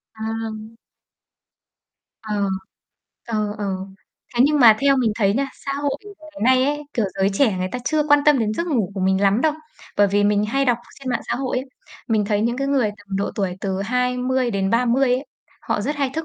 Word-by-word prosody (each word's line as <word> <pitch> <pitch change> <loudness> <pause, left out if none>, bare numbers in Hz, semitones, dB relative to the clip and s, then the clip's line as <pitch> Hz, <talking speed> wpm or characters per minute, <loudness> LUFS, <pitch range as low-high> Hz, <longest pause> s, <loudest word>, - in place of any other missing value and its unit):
À. 220 0 -5 1.4
Ờ, 210 -3 -1 0.8
ờ, 215 -2 -1
ờ. 205 - -2 0.7
Thế 240 - +4
nhưng 300 0 +2
mà 225 -3 +8
theo 275 0 +4
mình 235 -5 +2
thấy 200 -3 +2
nha, 275 +3 0 0.2
xã 275 - -1
hội, 285 0 -1
kiểu, 410 -1 -12
ngày 310 -4 -10
nay 255 - +3
ấy, 295 +2 -1
kiểu, 230 -4 0
giới 190 - +3
trẻ 210 -1 +2
người 185 0 -1
ta 250 - -2
chưa 310 +1 +2
quan 290 0 +6
tâm 295 -2 +6
đến 215 -2 0
giấc 335 +10 -2
ngủ 235 - 0
của 195 - -3
mình 190 +1 +2
lắm 200 +3 +3
đâu. 310 +1 +3 0.4
Bởi 205 - +5
vì 205 +1 +2
mình 205 0 +2
hay 275 +6 0
đọc 245 -3 +2 0.2
trên 265 - -6
mạng 240 - 0
xã - - +1
hội 260 -1 -2
ấy, 260 - -5 0.4
mình 220 -2 +2
thấy 205 0 0
những 235 +2 0
cái 275 +1 -1
người 265 -6 +2
tầm 205 -2 -6
độ 200 - -1
tuổi 190 -3 -2
từ 195 -1 -2
20-30 250 0 +1
ấy, 260 +3 -4 0.3
họ - - -2
rất 285 +8 -2
hay 275 -2 0
thức 320 +1 -2
235 Hz, 210 wpm, -21 LUFS, 205-275 Hz, 1.4 s, mà